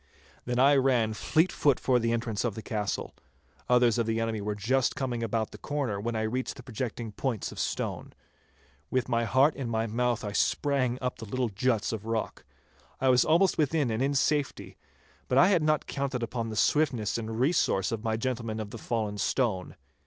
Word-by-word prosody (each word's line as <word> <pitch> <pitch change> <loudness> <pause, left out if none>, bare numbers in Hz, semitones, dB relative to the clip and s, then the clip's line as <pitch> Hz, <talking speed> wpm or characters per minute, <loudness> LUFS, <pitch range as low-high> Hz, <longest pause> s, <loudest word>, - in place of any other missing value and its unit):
Then 120 0 -2
I 140 +3 +6
ran 125 -5 +2
fleet 160 - +1
foot 140 -4 +2
for 125 -2 +2
the 115 0 0
entrance 115 -2 -1
of 115 -5 -1
the 110 - -7
castle. 105 -3 -3 0.6
Others 125 -1 +4
of 115 - 0
the 115 0 0
enemy 115 -2 -1
were 105 +1 -2
just 125 +5 +1
coming 125 -3 -2
about 115 -1 -1
the - - -11
corner 135 -9 -2
when 115 +2 -2
I 110 - 0
reached 125 +4 -2
the 125 - -11
projecting 120 -2 -5
points 115 0 -3
of - - -9
stone. - - -3 0.8
With 130 -1 0
my 115 -2 +1
heart 135 +7 +3
in 130 -4 -4
my 115 0 0
mouth 120 +1 0
I 105 - -3
sprang 130 +2 +1
up 125 - -2
the 115 - -6
little 125 +2 -1
juts 110 +1 0
of 110 0 -5
rock. 115 -1 -3 0.5
I 135 - +2
was 125 -1 +5
almost 175 +3 +3
within 150 -4 +1
and 110 +2 -1
in 140 +1 +1
safety, 145 +1 0 0.5
but 125 - +1
I 180 +6 +7
had 180 -5 +3
not 155 0 +1
counted 135 -3 -3
upon 115 0 -3
the 110 - -5
swiftness 120 -6 +1
and 110 0 -5
resource 130 - +2
of 115 -1 -3
my 110 -1 0
gentleman 115 -2 -3
of 105 -1 -5
the 115 - -7
fallen 105 -3 -2
stone. 105 -9 0
120 Hz, 200 wpm, -28 LUFS, 110-130 Hz, 0.8 s, I